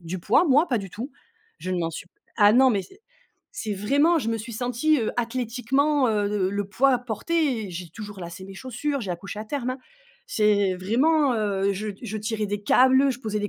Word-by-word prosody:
du 175 Hz, +1 st, -6 dB
poids 250 Hz, -, +3 dB
moi? 295 Hz, +3 st, +4 dB
Pas 245 Hz, -, +1 dB
du 195 Hz, -1 st, -6 dB
tout. 240 Hz, -, -7 dB, 0.5 s
Je 185 Hz, -, -4 dB
ne 180 Hz, -, -1 dB
m'en 165 Hz, -, -1 dB
suis 165 Hz, +2 st, -8 dB
p -, -, -32 dB, 0.2 s
ah 205 Hz, -2 st, +6 dB
non, 260 Hz, +2 st, +6 dB
mais, 200 Hz, -4 st, 0 dB
c'est 385 Hz, -, -17 dB, 0.5 s
c'est 215 Hz, -, -3 dB
vraiment 285 Hz, -, +3 dB
je 225 Hz, -, -3 dB
me 225 Hz, -, -1 dB
suis 230 Hz, +2 st, -7 dB
sentie, 250 Hz, +6 st, +1 dB
heu, 220 Hz, -, -1 dB
athlétiquement, 255 Hz, +4 st, 0 dB
heu, 210 Hz, -2 st, +1 dB
le 200 Hz, -2 st, 0 dB
le 200 Hz, 0 st, -2 dB
poids 255 Hz, +5 st, +3 dB
porté, 250 Hz, +1 st, -1 dB
et 185 Hz, -, -8 dB
j'ai 175 Hz, -1 st, -7 dB
toujours 205 Hz, 0 st, -9 dB
lacé 170 Hz, +2 st, -8 dB
mes 195 Hz, -, -10 dB
chaussures, 260 Hz, +6 st, -3 dB
j'ai 195 Hz, -6 st, -4 dB
accouché 195 Hz, +4 st, -6 dB
à 215 Hz, -, -6 dB
terme, 255 Hz, +1 st, -3 dB
hein. 255 Hz, -, -4 dB, 0.5 s
C'est 205 Hz, -3 st, +2 dB
vraiment, 260 Hz, -, +2 dB
heu, 200 Hz, -2 st, 0 dB
je 210 Hz, +3 st, -4 dB
je 220 Hz, -2 st, -4 dB
tirais 215 Hz, 0 st, -2 dB
des 205 Hz, 0 st, -4 dB
câbles, 260 Hz, +5 st, +5 dB
je 250 Hz, 0 st, -5 dB
posais 215 Hz, -3 st, -2 dB
des 205 Hz, -, -2 dB
220 Hz, 225 wpm, -25 LUFS, 200-260 Hz, 0.5 s, ah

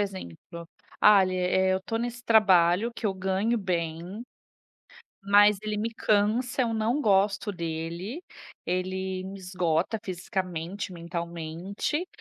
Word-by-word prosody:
exemplo: 170 Hz, -, -6 dB, 0.3 s
"Ah, 205 Hz, -2 st, +7 dB
ele 185 Hz, 0 st, -1 dB
eh, 185 Hz, +1 st, +2 dB
eu 190 Hz, -, -1 dB
tô 225 Hz, -, -2 dB
nesse 240 Hz, +1 st, -4 dB
trabalho 200 Hz, -1 st, +4 dB
que 225 Hz, -, -3 dB
eu 195 Hz, -, 0 dB
ganho 190 Hz, +5 st, 0 dB
bem, 175 Hz, +2 st, -3 dB, 1.0 s
mas 205 Hz, +1 st, +6 dB
ele 215 Hz, -1 st, -3 dB
me 220 Hz, +2 st, -1 dB
cansa, 220 Hz, +5 st, +1 dB
eu 230 Hz, -1 st, -1 dB
não 225 Hz, +6 st, 0 dB
gosto 200 Hz, -1 st, +2 dB
dele, 170 Hz, -, -5 dB, 0.4 s
ele 185 Hz, +1 st, -2 dB
me 195 Hz, +1 st, -7 dB
esgota 180 Hz, +2 st, -1 dB
fisicamente, 185 Hz, 0 st, -4 dB
mentalmente, 170 Hz, -, -4 dB
190 Hz, 125 wpm, -27 LUFS, 175-210 Hz, 1.0 s, Ah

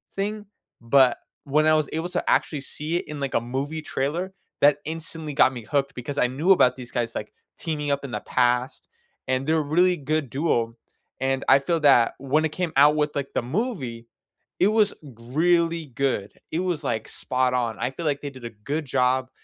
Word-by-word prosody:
thing, 205 Hz, +1 st, -3 dB, 0.4 s
but 125 Hz, +1 st, +4 dB, 0.3 s
when 150 Hz, +2 st, +2 dB
I 155 Hz, -, +5 dB
was 155 Hz, -2 st, 0 dB
able 165 Hz, +3 st, -2 dB
to -, -, -3 dB
actually 145 Hz, -3 st, +1 dB
see 155 Hz, +4 st, -3 dB
it -, -, -5 dB
in, 150 Hz, -1 st, -6 dB
like, 140 Hz, -1 st, -3 dB
a -, -, +3 dB
movie 135 Hz, +6 st, -3 dB
trailer, 165 Hz, +9 st, -2 dB, 0.3 s
that 145 Hz, 0 st, +5 dB
instantly 160 Hz, -1 st, -5 dB
got 135 Hz, -2 st, +4 dB
me 115 Hz, -3 st, -8 dB
hooked 140 Hz, +4 st, 0 dB
because 140 Hz, +3 st, -6 dB
I -, -, +4 dB
knew 150 Hz, +9 st, +1 dB
about 125 Hz, -9 st, +5 dB
these 125 Hz, -2 st, -9 dB
guys, 120 Hz, -1 st, -2 dB
like, 105 Hz, -, -5 dB, 0.2 s
teaming 150 Hz, -3 st, -2 dB
up 140 Hz, 0 st, -1 dB
in 135 Hz, -, -6 dB
the -, -, -3 dB
past, 125 Hz, 0 st, 0 dB, 0.4 s
and 130 Hz, +1 st, 0 dB
they're 160 Hz, +1 st, +2 dB
a 155 Hz, -, +2 dB
really 175 Hz, +5 st, +3 dB
good 150 Hz, -1 st, -1 dB
duo, 120 Hz, -6 st, 0 dB, 0.5 s
and 135 Hz, 0 st, 0 dB
I 140 Hz, -, +7 dB
feel 165 Hz, +4 st, 0 dB
that 130 Hz, -5 st, +5 dB
when 145 Hz, +4 st, +1 dB
it -, -, 0 dB
came 175 Hz, -1 st, -3 dB
out 145 Hz, +2 st, +6 dB
with, 150 Hz, -1 st, 0 dB
like, 140 Hz, -1 st, -2 dB
the -, -, +2 dB
movie, 130 Hz, -, -3 dB, 0.5 s
it 190 Hz, -, +5 dB
was 215 Hz, -1 st, +3 dB
really 160 Hz, +6 st, 0 dB
good, 125 Hz, -5 st, -2 dB, 0.2 s
it 165 Hz, -, 0 dB
was, 180 Hz, -4 st, -1 dB
like, 110 Hz, -4 st, -2 dB
spot 130 Hz, 0 st, -1 dB
on. 120 Hz, -3 st, 0 dB
I 125 Hz, +3 st, -1 dB
feel 160 Hz, +4 st, -6 dB
like 145 Hz, -1 st, 0 dB
they 145 Hz, -, -5 dB
did 130 Hz, -3 st, -13 dB
a 120 Hz, -, -5 dB
good 140 Hz, +9 st, -4 dB
job 130 Hz, 0 st, +1 dB
140 Hz, 205 wpm, -24 LUFS, 125-160 Hz, 0.5 s, I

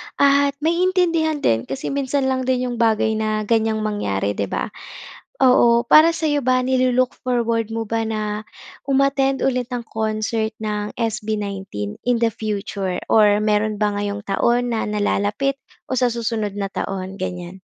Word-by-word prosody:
at 280 Hz, 0 st, +3 dB
maiintindihan 335 Hz, -3 st, +1 dB
din, 115 Hz, 0 st, +1 dB
kasi 135 Hz, -, -4 dB
minsan 275 Hz, 0 st, 0 dB
lang 260 Hz, -1 st, 0 dB
din 255 Hz, -1 st, +1 dB
'yong 240 Hz, -, -5 dB
bagay 220 Hz, -1 st, +2 dB
na 215 Hz, 0 st, -1 dB
ganyang 220 Hz, 0 st, +1 dB
mangyari, 100 Hz, -, -1 dB
'di 100 Hz, -1 st, -2 dB
ba? -, -, -3 dB, 0.7 s
Oo, 240 Hz, -2 st, +5 dB
para 310 Hz, +7 st, +6 dB
sa'yo 300 Hz, -4 st, -1 dB
ba, 255 Hz, 0 st, +3 dB
nilu-look 255 Hz, 0 st, +1 dB
forward 230 Hz, -3 st, 0 dB
mo 225 Hz, -, -2 dB
ba 225 Hz, 0 st, 0 dB
na, 215 Hz, -1 st, -3 dB, 0.4 s
um-attend 275 Hz, 0 st, +2 dB
ulit 255 Hz, -2 st, +1 dB
ng 245 Hz, -, -2 dB
concert 220 Hz, 0 st, -1 dB
ng 210 Hz, -1 st, -3 dB
SB19 200 Hz, -, -3 dB
in 245 Hz, -1 st, +1 dB
the 230 Hz, -, +4 dB
future? 200 Hz, -4 st, -3 dB
Or 210 Hz, -1 st, +5 dB
meron 215 Hz, 0 st, 0 dB
ba 210 Hz, -1 st, +1 dB
ngayong 205 Hz, 0 st, -3 dB
taon 240 Hz, +5 st, +1 dB
na 230 Hz, -2 st, -1 dB
nalalapit 210 Hz, +5 st, 0 dB, 0.3 s
o 260 Hz, -, -1 dB
sa 245 Hz, -1 st, +2 dB
susunod 225 Hz, -3 st, -2 dB
na 200 Hz, -1 st, -3 dB
taon, 195 Hz, -1 st, -4 dB
ganyan? 180 Hz, 0 st, -6 dB
225 Hz, 150 wpm, -21 LUFS, 210-255 Hz, 0.7 s, para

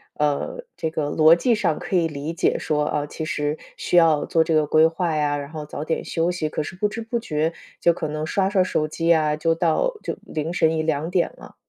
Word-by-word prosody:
呃， 150 Hz, -, -1 dB
这 160 Hz, -, -2 dB
个 155 Hz, -2 st, -2 dB
逻 160 Hz, +1 st, +6 dB
辑 235 Hz, +7 st, +2 dB
上 180 Hz, -8 st, 0 dB
可 190 Hz, -, -4 dB
以 170 Hz, -2 st, +3 dB
理 150 Hz, +1 st, -5 dB
解 170 Hz, -, +1 dB
说， 150 Hz, -1 st, 0 dB
啊， 145 Hz, 0 st, -1 dB
其 160 Hz, +2 st, -6 dB
实 150 Hz, -3 st, -2 dB, 0.2 s
需 -, -, -2 dB
要 160 Hz, -3 st, +5 dB
做 165 Hz, -1 st, +2 dB
这 160 Hz, -1 st, 0 dB
个 155 Hz, -1 st, +3 dB
规 155 Hz, +2 st, +5 dB
划 165 Hz, -1 st, -1 dB
呀， 145 Hz, -1 st, +1 dB
然 140 Hz, 0 st, -6 dB
后 155 Hz, -2 st, -6 dB
早 150 Hz, 0 st, -6 dB
点 160 Hz, 0 st, -2 dB
休 170 Hz, +2 st, 0 dB
息， 155 Hz, -4 st, -2 dB
可 155 Hz, -, -2 dB
是 180 Hz, -, -7 dB
不 210 Hz, +3 st, +1 dB
知 225 Hz, +2 st, -6 dB
不 230 Hz, +1 st, -2 dB
觉 160 Hz, -6 st, -1 dB, 0.3 s
就 170 Hz, -, +4 dB
可 165 Hz, -2 st, -4 dB
能 155 Hz, +1 st, -3 dB
刷 195 Hz, +4 st, +1 dB
刷 195 Hz, -2 st, +3 dB
手 155 Hz, -4 st, 0 dB
机 165 Hz, +2 st, -3 dB
呀， 155 Hz, -3 st, +3 dB
就 165 Hz, +2 st, +1 dB
到 170 Hz, -, +1 dB
就 -, -, -3 dB
凌 155 Hz, +1 st, -4 dB
晨 160 Hz, -2 st, +2 dB
1:00-2:00 160 Hz, +3 st, 0 dB
了。 -, -, -14 dB
160 Hz, 245 characters per minute, -23 LUFS, 150-170 Hz, 0.3 s, 逻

